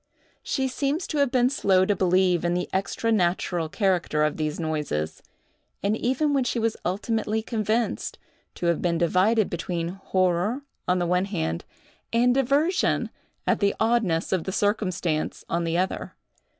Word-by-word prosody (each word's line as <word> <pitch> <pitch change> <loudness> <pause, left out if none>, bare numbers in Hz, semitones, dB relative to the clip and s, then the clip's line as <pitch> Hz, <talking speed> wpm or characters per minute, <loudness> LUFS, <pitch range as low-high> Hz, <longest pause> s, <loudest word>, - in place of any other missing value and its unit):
She 265 -1 -1
seems 280 +6 -1
to 300 - -2
have 280 -2 +3
been 250 0 +3
slow 190 -8 +3
to 205 - +1
believe 180 -1 +2
in 175 0 +1
the 180 - -1
extra 195 +4 -1
natural 175 -4 +1
character 180 -6 +1
of 150 -1 +1
these 155 0 -2
noises; 150 - -2 0.6
and 205 +2 +2
even 265 +6 +1
when 275 -2 +2
she 245 - -1
was 225 -1 0
ultimately 215 +3 -1
convinced, 225 0 -1 0.4
to - - -4
have 170 -2 +2
been 170 -1 +1
divided 185 +6 +3
between 170 -1 -3
horror 190 +6 0 0.2
on 180 0 +3
the 175 - 0
one 180 +2 +2
hand, 160 - -3 0.5
and 245 +2 +4
diversion, 280 +8 +1 0.3
at - - +2
the 200 -1 +2
oddness 220 -8 +1
of 185 -4 0
the 190 - -2
circumstance, 185 -6 -1
on 170 0 -1
the 165 +1 0
other. 185 +1 -2
190 Hz, 160 wpm, -25 LUFS, 175-230 Hz, 0.6 s, and